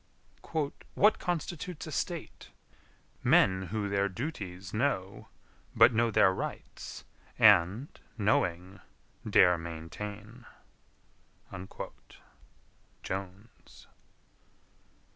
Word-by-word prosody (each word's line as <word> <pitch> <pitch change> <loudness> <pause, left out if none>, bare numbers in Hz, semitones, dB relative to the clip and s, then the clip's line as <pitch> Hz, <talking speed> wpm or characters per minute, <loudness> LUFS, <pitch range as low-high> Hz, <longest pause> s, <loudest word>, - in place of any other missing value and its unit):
"WHAT 210 +2 +4
constitutes 175 -1 -4
a 155 - -7
state? 170 +3 -4 0.7
Men 95 0 +4
who 105 +2 -2
their 100 0 +1
duties 95 - -6
know, 105 -5 -1 0.5
But - - +7
know 115 +1 +2
their 100 -3 +4
rights, - - -7 0.3
and, 105 +2 +5 0.3
knowing, 95 -3 0 0.5
Dare 90 -1 +5
maintain." 105 +8 -8 2.6
Jones. 95 +4 -8
100 Hz, 70 wpm, -30 LUFS, 95-120 Hz, 2.6 s, But